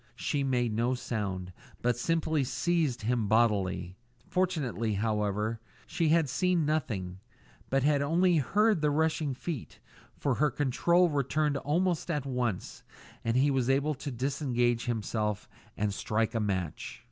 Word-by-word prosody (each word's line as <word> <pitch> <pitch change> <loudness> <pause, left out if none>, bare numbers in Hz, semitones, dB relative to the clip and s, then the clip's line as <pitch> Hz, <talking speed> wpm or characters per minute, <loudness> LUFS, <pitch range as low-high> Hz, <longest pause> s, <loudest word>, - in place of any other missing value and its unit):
She 145 -1 -1
made 125 -4 +1
no 120 +4 +1
sound, 95 -7 -4 0.3
but 120 0 +2
simply 160 +3 0
seized 135 0 0
him 115 -1 0
bodily. 95 -5 +1 0.3
Fortunately, 130 - 0
however, 105 +1 -1 0.3
she 165 -3 0
had 160 -1 +4
seen 180 +3 +1
nothing, 105 -12 -2 0.5
but 135 0 +2
had 145 -1 +3
only 170 +4 +3
heard 205 - +2
the 150 - +3
rushing 155 -2 0
feet, 150 -1 -6 0.4
for 140 - 0
her 150 +4 +2
control 160 +6 +2
returned 145 +1 +1
almost 170 +5 0
at 150 -5 -1
once, 125 -7 -2 0.4
and 115 +2 +1
he 140 +2 +4
was 130 -2 +1
able 140 +3 +2
to 145 +1 -6
disentangle 125 -2 0
himself 110 -2 -2 0.3
and 105 -1 0
strike 110 +3 -1
a 115 - 0
match. 95 -6 -3
130 Hz, 140 wpm, -30 LUFS, 110-155 Hz, 0.5 s, had